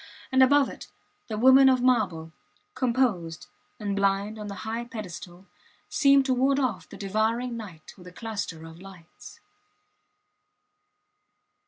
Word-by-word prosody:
And, 260 0 +4
above 275 +2 +5
it, - - -10 0.4
the 215 - -4
woman 260 +3 +7
of 255 -1 +2
marble, 190 -11 +1 0.4
composed 230 -11 -1 0.3
and 205 -2 -3
blind 200 +2 0
on 210 - -6
the 200 -1 -8
high 225 +2 -3
pedestal, 185 -5 -9 0.4
seemed 275 -1 +4
to 260 - +1
ward 270 +2 +2
off 220 -12 -2
the - - -11
devouring 220 +5 -1
night 190 -9 -10
with 180 - -13
a - - -10
cluster 200 -6 -6
of 165 +1 -12
lights. 185 -3 -14
215 Hz, 135 wpm, -26 LUFS, 185-255 Hz, 0.4 s, woman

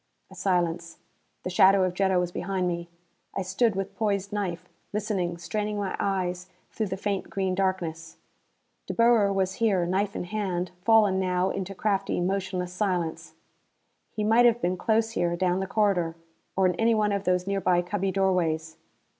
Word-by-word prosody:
A - - -12
silence. 170 -3 -1 0.5
The 185 - -3
shadow 190 +1 +5
of 185 -1 0
Jetta 190 0 +2
was 175 -1 -1
behind 185 0 -2
me. 170 -1 -3 0.5
I 195 - -1
stood 190 +4 +1
with 195 +1 -4
poised 200 -1 -1
knife, 180 -4 -3 0.3
listening, 195 -5 -1
straining 210 +5 -3
my 200 -2 -2
eyes 185 -2 -2 0.2
through 220 - -2
the 190 0 -4
faint 200 -1 -2
green 190 -1 -1
darkness. 175 -4 -2 0.7
De - - -4
Boer 230 -4 +4
was 190 -1 0
here, 195 -6 +3
knife 195 +3 -1
in - - -3
hand, 185 -2 -2
fallen 210 -2 +4
now 185 0 +1
into 195 0 -4
craftly, 195 -2 0
motionless 185 -1 -2
silence. 180 -4 -2 0.7
He 215 - -4
might 230 +3 +5
have 235 0 +2
been 180 -4 0
close 225 +4 +1
here 175 -6 0
down 180 +1 +1
the 190 - -2
corridor. 190 -6 +1 0.4
Or 190 - +3
in 180 - +3
any 225 0 +3
one 210 -1 +2
of 200 0 -2
these 180 0 +1
nearby 185 -3 +1
cubby 195 +1 -1
doorways. 170 -5 0
190 Hz, 170 wpm, -27 LUFS, 180-205 Hz, 0.7 s, shadow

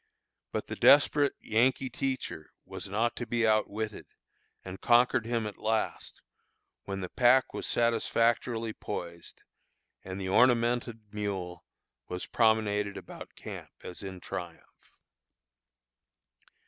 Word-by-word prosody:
But - - -3
the - - -6
desperate 145 0 +5
Yankee 125 +4 +1
teacher 130 - -3 0.2
was - - -6
not 115 +4 0
to 120 - -4
be 115 0 +1
outwitted, 110 0 0 0.6
and 95 0 -8
conquered 120 -1 +4
him 115 -2 -1
at 105 - -7
last, 110 0 -2 0.6
when 95 0 -4
the 90 - -5
pack 130 +1 +4
was - - -4
satisfactorily 115 0 +1
poised, 85 -5 -7 0.6
and 95 +1 -6
the 95 - -4
ornamented 115 0 +2
mule 95 -4 -4 0.4
was 90 0 -4
promenaded 105 -3 +1
about - - -10
camp - - -8
as 90 - -7
in 95 -2 -7
triumph. 85 -1 -9
110 Hz, 115 wpm, -30 LUFS, 100-120 Hz, 0.6 s, desperate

